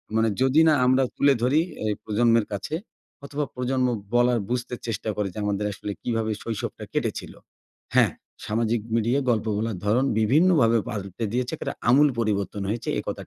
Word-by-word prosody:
মানে 110 0 +3
যদি 135 +4 +4
না 155 - +6
আমরা 130 +1 +4
তুলে 140 0 +4
ধরি 135 +6 +3 0.2
এই 105 - +1
প্রজন্মের 115 0 +2
কাছে 100 +10 -3 0.5
অথবা 145 +1 -2
প্রজন্ম 125 0 0 0.3
বলার, 120 -1 +3
বুঝতে 125 0 -2
চেষ্টা 110 0 -3
করে 105 -1 -1
যে - - -12
আমাদের 105 0 -1
আসলে 105 - -6
কিভাবে 115 -2 -1
শৈশবটা 115 -3 -4
কেটেছিল। - - -2 0.6
হ্যাঁ, - - +5 0.3
সামাজিক 115 +1 0
মিডিয়ায় 120 +5 +1
গল্প 110 -1 0
বলার 110 -2 -2
ধরন 115 +6 +3
বিভিন্নভাবে 130 - +4
পাল্টে 100 +1 -4
দিয়েছে, 125 0 -1
এক্কেরে - - -4 0.2
আমূল 145 +4 +6
পরিবর্তন 100 -3 -1
হয়েছে। 115 +2 -3
এ - - -2
কথা - - -5
115 Hz, 165 wpm, -25 LUFS, 110-130 Hz, 0.6 s, না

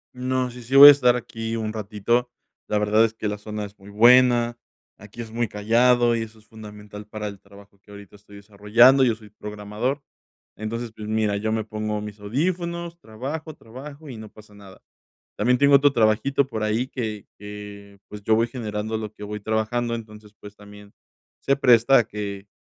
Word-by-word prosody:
No, 130 0 -2
sí, 125 0 -11
sí 125 +4 -4
voy 145 +1 +12
a - - +12
estar 125 -3 +3
aquí 115 -1 -5
un 110 -1 -3
ratito. 110 +3 -1 0.4
La 105 - 0
verdad 105 +2 +3
es 115 0 -1
que 110 - -4
la 105 0 -4
zona 105 0 -6
es 100 0 -14
muy 100 +1 -14
buena, 120 +1 +4 0.4
aquí 105 +4 -10
es 110 -1 -9
muy 120 0 -1
callado 120 +3 +2
y 115 - -2
eso 110 0 -8
es 110 - -22
fundamental 105 -1 -12
para 105 0 -6
el 100 -1 -9
trabajo 100 0 -18
que 105 - -27
ahorita 100 -1 -13
estoy 100 0 -17
desarrollando. 105 +6 +4
Yo 115 -3 +2
soy 105 -2 -17
programador. 105 +7 -5 0.5
Entonces, 115 +2 -5
pues, 105 -1 -8
mira, 110 -2 0
yo 110 +1 -2
me 110 -1 -1
pongo 105 0 -4
mis 105 0 -9
audífonos, 170 - -3
trabajo, 140 +8 -7
trabajo 140 +6 -12
y 125 -4 -8
no 110 -1 -10
pasa 105 -1 -17
nada. 100 -2 -16 0.5
También 125 +4 +2
tengo 140 0 +6
otro 140 0 +3
trabajito 120 +5 +2
por 110 -5 -5
ahí 110 +4 -1
que 110 -6 -5
que, 105 -1 -11
pues, 105 -1 -10
yo 110 +1 +2
voy 115 +2 +1
generando 110 -2 -4
lo 110 -1 -6
que - - -14
voy 105 0 -6
trabajando, 110 +3 -1
entonces, 105 -2 -10
pues, 105 0 -12
también 105 0 -15 0.5
se 140 - +1
presta 125 0 +5
a 115 - +2
que 100 -2 -7
110 Hz, 195 wpm, -23 LUFS, 105-120 Hz, 0.5 s, voy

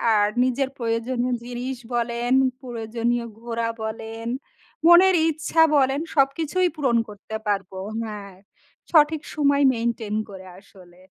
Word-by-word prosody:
আর 205 0 +4 0.2
নিজের 260 +1 0
প্রয়োজনীয় 240 +2 -1
জিনিস 245 +1 -4 0.2
বলেন, 235 +1 0 0.3
প্রয়োজনীয় 235 0 -2 0.2
ঘোরা 230 -1 -2
বলেন, 225 +1 -6 0.6
মনের 365 +2 +7
ইচ্ছা 320 +1 +2
বলেন 270 +1 +2
সবকিছুই 300 +6 +2
পূরণ 265 -6 +1
করতে 210 +1 -9
পারব।" 195 -2 -1 0.3
হ্যাঁ। 205 -3 -8 0.6
সঠিক 310 -1 +4
সময় 285 -1 +2
মেইনটেইন 230 -2 -2
করে 190 -1 -10
আসলে। 185 -3 -19
240 Hz, 115 wpm, -23 LUFS, 220-275 Hz, 0.6 s, মনের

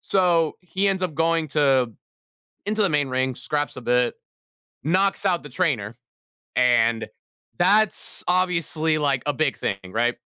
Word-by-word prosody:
So, 175 -4 +2
he 190 +2 -1
ends 190 -1 -1
up 180 -4 -2
going 165 0 +1
to 135 -5 +2 0.7
into 215 +2 -1
the 200 - +4
main 145 -3 +1
ring, 130 0 -1
scraps 145 +3 -3
a - - -6
bit, 125 0 +1 0.7
knocks 190 +7 +1
out 180 -3 +1
the 145 - -10
trainer, 125 - -1 0.6
and 115 -2 +2 0.5
that's 205 +3 +2
obviously, 170 -3 +1
like, 140 -4 0
a 145 - 0
big 145 -1 0
thing, 100 - -2
right? 120 +4 0
155 Hz, 145 wpm, -23 LUFS, 130-180 Hz, 0.7 s, the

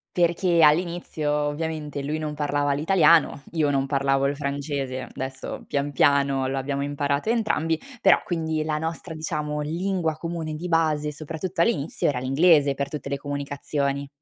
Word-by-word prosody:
Perché 175 0 +2
all'inizio 160 -1 +2
ovviamente, 150 0 -2
lui 150 +3 -2
non 150 -1 -4
parlava 145 -1 0
l'italiano, 160 -1 +4
io 155 -3 +1
non 135 -1 +1
parlavo 135 0 +1
il 140 - 0
francese, 140 -2 -3
adesso 130 0 -6
pian 145 0 -1
piano 140 -1 +3
lo 135 - -1
abbiamo 140 +1 -2
imparato 145 +5 -1
entrambi, 165 -9 0 0.2
però, 195 - +5
quindi 160 -3 -1
la 155 -1 -1
nostra 160 +1 -5
diciamo 150 -2 -3
lingua 170 +1 -1
comune 165 -1 -4
di 165 +4 -5
base, 155 -3 +1
soprattutto 160 +4 -5
all'inizio 165 -7 +1
era 140 -4 0
l'inglese 140 +2 +4
per 140 0 -3
tutte 150 -2 -5
le 140 0 -2
comunicazioni. 140 0 -3
150 Hz, 150 wpm, -24 LUFS, 140-160 Hz, 0.2 s, però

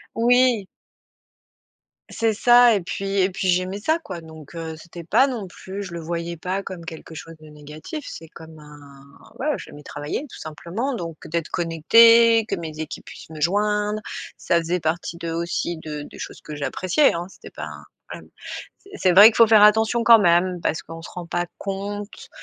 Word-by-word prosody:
Oui! 245 -2 +3 1.4
C'est 225 -1 0
ça 240 +1 +6
et 200 - 0
puis 195 +3 -4
et 185 - +3
puis 190 0 -3
j'aimais 185 +3 0
ça 315 +9 +1
quoi, 185 - -8
donc, 160 -1 -13
heu, 160 -1 -6
c'était 170 +1 -11
pas 235 +10 +4
non 240 -7 -4
plus 190 +2 -8
je 185 -3 -8
le 170 - -5
voyais 170 +1 -4
pas 185 +4 -3
comme 175 -4 -8
quelque 160 0 -9
chose 165 +2 -9
de 155 0 -15
négatif, 150 - -9
c'est 165 - -9
comme 160 0 -13
un 150 -1 -14 0.6
ouais 270 - -4
j'aimais 145 - -11
travailler 145 - -5
tout - - -11
simplement, 175 - -4
donc 165 -7 -6
d'être 165 0 -3
connectée, 230 +7 +5
que - - -1
mes 160 -2 -7
équipes 160 - -7
puissent - - -12
me 155 -1 -9
joindre, 210 +3 +1 0.4
ça 170 - 0
faisait 170 +1 -2
partie 165 +2 -3
de, 165 -1 -4
aussi, 170 +1 -2
de 155 -2 -7
des - - -12
choses - - -8
que 150 - -9
j'appréciais, 185 - +1
hein 170 +1 -4
c'était - - -14
pas - - -7
un, - - -10 0.4
hem - - -18 0.5
c - - -21
c'est 185 - +2
vrai 200 +4 +10
qu'il 225 - +5
faut 230 - +7
faire 215 -1 +6
attention 220 +2 +4
quand 230 -1 +8
même, 175 -1 +2
parce - - -1
qu'on 165 0 -10
se - - -10
rend 180 -1 -8
pas 175 +1 -2
compte 200 +1 -6
180 Hz, 195 wpm, -22 LUFS, 165-210 Hz, 1.4 s, vrai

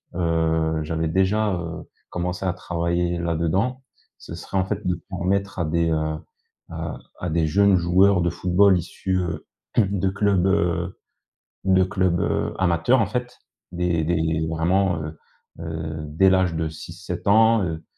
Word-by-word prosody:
heu 80 -2 +1
j'avais 80 +1 -2
déjà, 95 +5 +1
heu, 85 -2 -5 0.3
commencé 90 +1 -3
à 90 - 0
travailler 85 0 -1
là-dedans. 85 +10 -1 0.3
Ce - - -10
serait, 85 +3 -5
en 95 - +2
fait, - - -4
de 90 - +1
permettre 95 +2 -1
à 85 - +1
des, 85 +1 +1
heu, 80 0 -1 0.5
à - - -5 0.2
à 90 - -3
des 80 0 +1
jeunes 100 +4 +4
joueurs 90 +2 +4
de 85 - +1
football 90 +3 +3
issus 95 +2 -3
heu, 90 -2 -4 0.3
de 100 -3 +2
clubs, 100 -1 +1
heu, 85 -2 0 0.7
de 95 -1 +4
clubs, 95 -2 0
heu, - - -1
amateurs, 95 +7 +3
en 110 - +1
fait, 125 0 -4 0.3
dès 85 -2 0
dès 85 +1 +1 0.3
vraiment, 90 +3 +1
heu, 75 +1 -7 0.4
heu, 80 -1 -5
dès 80 +6 +3
l'âge 95 -3 +2
de 80 0 -1
6-7 85 +4 -7
ans, 110 +1 +5
heu, 80 -2 -4
90 Hz, 155 wpm, -23 LUFS, 85-95 Hz, 0.7 s, ans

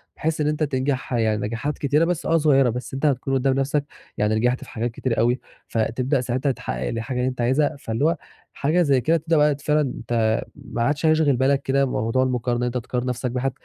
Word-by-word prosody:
بحيث 155 0 -1
إن 150 - +1
أنت 150 +1 0
تنجَح 130 -2 -1
يعني 110 -3 +1
نجاحات 115 +7 -3
كتيرة، 145 +3 +2
بس 175 -2 -2
آه 165 - +3
صغيّرة 140 -5 +4
بس 125 +3 -5
أنت 135 +3 -2
هتكُون 135 -2 +1
قُدّام 135 0 +2
نَفسك 140 +1 0 0.3
يعني 105 +1 +1
نجَحت 125 +3 +1
في - - -13
حاجات 120 +1 -3
كتيرة 115 +1 -2
أوي 120 +3 +2 0.3
فتبدأ 125 +5 0
ساعتها 130 +3 0
تحقّق 60 - -4
الحاجة 115 +3 -3
اللي 125 +1 +1
أنت 125 -1 -5
عايزها، 140 +5 +2
فاللي 115 +2 -1
هو 165 +1 +3 0.4
حاجة 155 +5 +1
زي 140 -6 +3
كده 165 +6 +3
تبدأ 165 +1 0
بقى 150 -1 +4
فعلًا 150 -2 +1
ت - - -2 0.4
ما 115 - -6
عادش 145 +6 0
هيشغِل 155 -3 +4
بالك 135 +2 +2
كده 140 0 +2
موضوع 120 0 0
المقارنة 125 -1 0
أنت 125 +1 -1
تقارن 125 +1 -3
نَفسك 125 0 -2
بحد، 130 +2 -1
130 Hz, 210 wpm, -23 LUFS, 120-145 Hz, 0.4 s, صغيّرة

